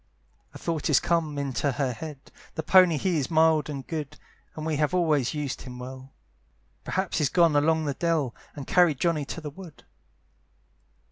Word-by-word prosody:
A - - -6
thought 165 -2 -2
is 145 - +5
come 165 -4 0
into 140 0 -1
her 130 -1 -1
head; 150 +2 -9 0.2
"The 160 - -3
pony 180 -2 +6
he 175 +1 0
is 135 - -2
mild 160 -2 +3
and 140 -3 -5
good, 155 -4 -5 0.4
"And 155 - -5
we 160 -2 -1
have 150 +4 +1
always 155 -7 +1
used 145 -3 -3
him 125 -1 -9
well; 130 +1 -9 0.7
"Perhaps 190 -2 -1
he's 145 -4 +2
gone 165 0 +4
along 160 +2 +2
the 145 - -1
dell, 155 -5 0 0.2
"And 145 -3 -7
carried 170 -5 +3
Johnny 165 -4 +1
to 165 - -6
the 150 -1 -6
wood." 170 -1 -12
150 Hz, 180 wpm, -26 LUFS, 140-165 Hz, 0.7 s, pony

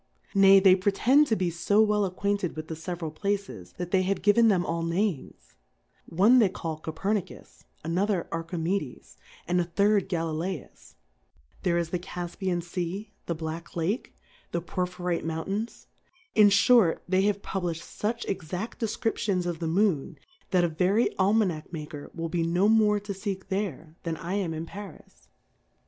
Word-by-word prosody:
Nay, 195 -1 +7
they 190 -1 +7
pre 195 +2 +1
tend 275 +8 +4
tQ 220 - +1
be 180 -2 0
fo 170 +5 +1
well 210 -1 +4
acquainted 195 0 -1
with 155 0 -7
the - - -3
fjveral 165 -1 -5
Pkces, 195 - -3
that 180 0 -5
they 190 - +4
have 185 -1 -1
given 225 +3 +5
them 185 -5 +3
all 165 0 -2
Names; 170 -1 -2 0.5
one 210 +9 +5
they 215 -5 +5
call 165 -4 -5
Cofer 175 +7 -2
iiictfSj - - -16 0.2
another 180 +3 0
Jrckrme^lesy 165 -2 -3 0.3
and 180 +1 +2
a - - -1
third' 200 +2 +2
Galikus\ 165 -1 -4 0.7
there 170 -2 +1
is 170 -1 -1
the 180 - -1
CaJjyianSea^ 175 +2 -4 0.2
the 170 - -1
Black 160 +1 -5
Lctke^ 180 +8 -1 0.4
the 170 - 0
Porj^hirite 180 -1 -2
Mount 160 0 -3
ai7is\ 215 +4 -4 0.5
m 210 -2 +7
fliort, 200 -2 +5
they 185 +1 +3
have 200 0 0
publiQi'd 175 -4 -3
fuch 230 +3 -3
ex 175 -5 -4
ad 190 +6 -3
Defcriptions 210 -4 -1
of 175 -2 -3
the 165 - -2
Moon, 175 -4 +1 0.3
that 180 -2 +3
a - - +4
very 185 +8 +1
Almanack 190 -5 +1
maker 150 -3 -7
will 165 0 -3
be 170 0 -1
no 175 +4 +2
more 215 -1 +4
to 205 0 -5
feek 195 -1 -5
tliere, 175 -6 -3
than 165 -1 -3
1 165 - -10
am 185 -5 -1
m 160 +1 -4
Paris. 170 - -11
180 Hz, 165 wpm, -27 LUFS, 165-200 Hz, 0.7 s, Nay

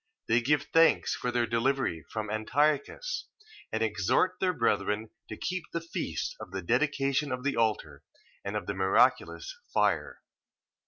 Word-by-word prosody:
They 115 +2 +3
give 145 +4 +2
thanks 165 0 +5
for 125 - -2
their 120 -1 +1
delivery 115 - 0
from 110 -1 -4
Antiochus: 145 - 0 0.4
and 110 - 0
exhort 110 - +1
their 185 -1 +2
brethren 110 - 0 0.2
to 110 - -6
keep 185 -2 -3
the 170 - 0
feast 165 0 -4
of - - -8
the 95 0 -5
dedication 140 - +1
of 125 0 -3
the 145 - 0
altar, 105 -11 0 0.4
and - - -4
of - - -2
the 100 - -2
miraculous 95 - +2 0.2
fire. - - 0
120 Hz, 150 wpm, -29 LUFS, 110-150 Hz, 0.4 s, thanks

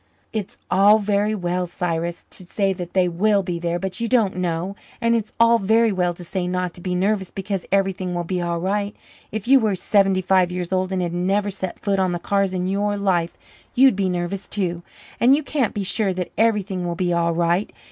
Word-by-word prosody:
It's 215 -3 -4
all 200 +3 +6
very 210 0 0
well, 180 -1 -1
Cyrus, 170 0 -3
to - - -9
say 195 +2 0
that 175 -2 -7
they 185 -2 +3
will 200 +4 +2
be 175 -2 -3
there, 170 0 -1
but 190 0 -5
you 230 - -1
don't 225 -6 +2
know. 180 +1 -2 0.2
And 230 0 +2
it's 220 -2 -2
all 230 0 +5
very 225 +3 +3
well 180 -2 0
to 175 - -10
say 180 +1 -3
not 180 -1 -2
to 175 - -11
be 180 0 -2
nervous 195 +1 0
because 195 -1 -4
everything 190 -2 0
will 175 - -1
be 180 +1 -2
all 170 -1 -1
right. 200 +3 -1 0.4
If 215 0 -5
you 270 +1 +7
were 215 -4 +1
seventy 195 0 +2
five 185 -1 +3
years 180 0 -3
old 185 0 0
and 185 -1 0
had 170 -1 -3
never 195 +3 0
set 190 -1 -5
foot 200 -1 0
on 185 -2 +1
the - - -1
cars 195 +1 0
in 180 -1 -2
your 205 +1 0
life 180 -4 0 0.4
you'd 265 -2 +6
be 195 -1 0
nervous 180 +2 -3
too, 175 -4 -2 0.4
and 255 +3 +6
you 305 - -2
can't 275 -6 -1
be 205 - -1
sure 195 0 0
that 180 -1 -4
everything 205 -5 +1
will 175 -1 -2
be 175 0 0
all 170 -1 +1
right. 175 +4 +1
190 Hz, 220 wpm, -22 LUFS, 175-205 Hz, 0.4 s, you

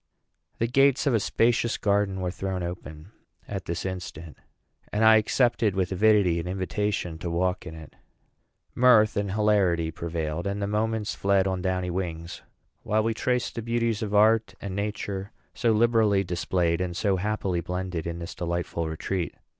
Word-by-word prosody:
The 115 - +1
gates 135 +2 +3
of 140 - +2
a 115 - +3
spacious 115 +3 +1
garden 100 -2 0
were 90 -1 -1
thrown 95 -1 -3
open 85 0 -7 0.4
at 95 -2 -5
this 85 +2 -4
instant, 85 -4 -6 0.6
and 110 +2 +2
I 110 0 +8
accepted 115 -2 +2
with 95 -1 0
avidity 100 -3 +3
an 85 - -5
invitation 95 -2 -2
to 85 0 -4
walk 90 +2 -1
in 80 - -7
it. 80 -2 -12 0.8
Mirth 120 -4 +5
and 100 -2 -1
hilarity 100 -6 +2
prevailed, 80 +1 -3
and 100 +1 -2
the 100 - -1
moments 105 +1 -1
fled 100 -1 +2
on 95 -1 -1
downy 90 -1 -1
wings, 85 -2 -4 0.4
while 110 +1 +1
we 115 +1 0
traced 125 +2 -1
the 115 - -4
beauties 115 -1 -1
of 105 -1 -2
Art 110 -1 +4
and 100 -2 -5
Nature, 100 -1 -3 0.2
so 115 - +1
liberally 110 -3 +3
displayed 90 -1 0
and 90 -1 -3
so 100 -2 +1
happily 95 -3 -1
blended 90 -1 -4
in 85 0 -4
this 85 0 -6
delightful 85 -1 -3
retreat. 85 +2 -3
95 Hz, 165 wpm, -26 LUFS, 90-110 Hz, 0.8 s, I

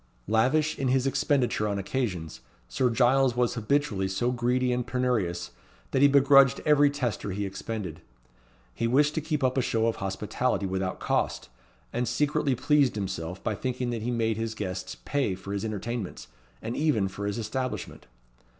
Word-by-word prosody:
Lavish 130 +9 +2
in 135 - 0
his 130 0 +2
expenditure 135 -5 +1
on 100 -1 -1
occasions, 95 - -3 0.3
Sir 125 - +1
Giles 125 +2 +3
was 125 -1 +1
habitually 115 -4 0
so 110 +6 0
greedy 125 +1 +1
and 125 -1 -2
penurious, 110 -10 -1 0.4
that 130 - +1
he 145 - +8
begrudged 140 -1 +6
every 145 -1 +5
tester 125 -7 -2
he 100 +1 -2
expended. 95 -3 -5 0.7
He 115 - -1
wished 145 +5 +3
to 160 - -1
keep 150 -2 -2
up 130 +1 +2
a - - +3
show 115 -2 0
of 115 - 0
hospitality 100 +4 -1
without 95 0 -2
cost, - - -1 0.4
and 120 +1 -1
secretly 145 +2 +1
pleased 145 -1 +3
himself 95 -3 -4
by 110 - 0
thinking 125 +3 -2
that 115 -2 -3
he 115 - -2
made 115 -2 0
his 115 0 -3
guests 95 -2 -5
pay 135 -10 0
for 95 +2 -7
his 100 - -2
entertainments, 110 -1 -4 0.3
and 115 +2 -3
even 145 -10 +2
for 100 +2 -5
his 100 - -2
establishment. 125 +3 -4
120 Hz, 170 wpm, -27 LUFS, 100-135 Hz, 0.7 s, he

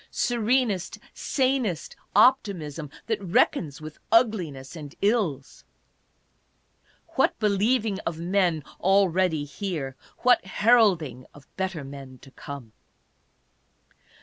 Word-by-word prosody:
Serenest, 235 -5 0 0.2
sanest 255 - -1 0.2
optimism, 180 - +2 0.2
that 220 -3 -2
reckons 165 -5 +1
with 155 0 -10
ugliness 175 - +1
and 150 -3 -9
ills! 190 - 0 1.5
What - - +1
believing 210 0 +1
of 165 -5 -4
men 175 -2 +1 0.2
already 185 -4 +2
here, 145 -3 -4 0.3
what 250 0 +5
heralding 190 - +2
of 145 -2 -16
better 190 -5 -3
men 135 -1 -10
to 135 - -14
come 135 -6 -9
185 Hz, 95 wpm, -26 LUFS, 145-215 Hz, 1.5 s, what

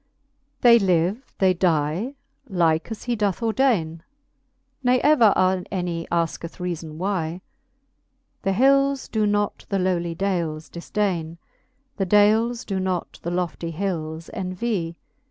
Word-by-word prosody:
XLI. - - -46
They 235 -1 +7
live, 190 +5 0
they 190 -1 +4
die, 175 - 0 0.3
like 165 -3 +1
as 225 - -6
he 245 -1 -1
doth 205 -4 0
ordaine, 220 -10 +1 0.8
Ne 250 0 +4
ever 280 -8 +5 0.4
any 175 -3 -3
asketh 170 0 -2
reafon 170 -4 -4
why. 175 0 -2 1.0
The 195 - 0
hils 275 +4 +3
doe 215 -1 +1
not 205 0 -1
the 200 - 0
lowly 175 -2 0
dales 165 -5 -2
difdaine 170 -2 -2 0.3
\ 270 +1 -45
The 195 -2 -1
dales 220 +4 +3
doe 195 -2 -2
not 185 -2 -3
the 170 - -3
lofty 175 -1 -2
hils 160 -3 -4
envy. 185 -2 -3
185 Hz, 130 wpm, -23 LUFS, 170-220 Hz, 1.0 s, They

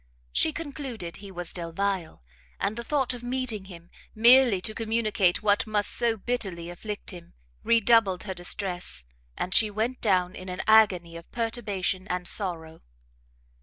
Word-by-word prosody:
She 315 - +2
concluded 270 - -6
he 200 0 -10
was 175 -2 -5
Delvile, 175 - -3 0.4
and 200 +2 -1
the 235 - -5
thought 270 -2 0
of 245 - -8
meeting 245 -5 -3
him 175 -2 -13 0.2
merely 235 -2 +6
to 215 - -3
communicate 215 -5 +1
what 210 +1 +2
must 210 -1 +1
so 235 -2 +2
bitterly 190 -7 -3
afflict 210 +5 -7
him, 175 -2 -12 0.3
redoubled 225 -4 +3
her 195 -2 -4
distress, 180 - 0 0.3
and 180 - -2
she 215 +1 +5
went 220 +5 -2
down 185 -4 +2
in 185 0 -8
an 180 - -4
agony 185 -6 +4
of 170 - -14
perturbation 205 -5 -2
and 180 0 -2
sorrow. 165 -5 -2
200 Hz, 150 wpm, -27 LUFS, 180-230 Hz, 0.4 s, merely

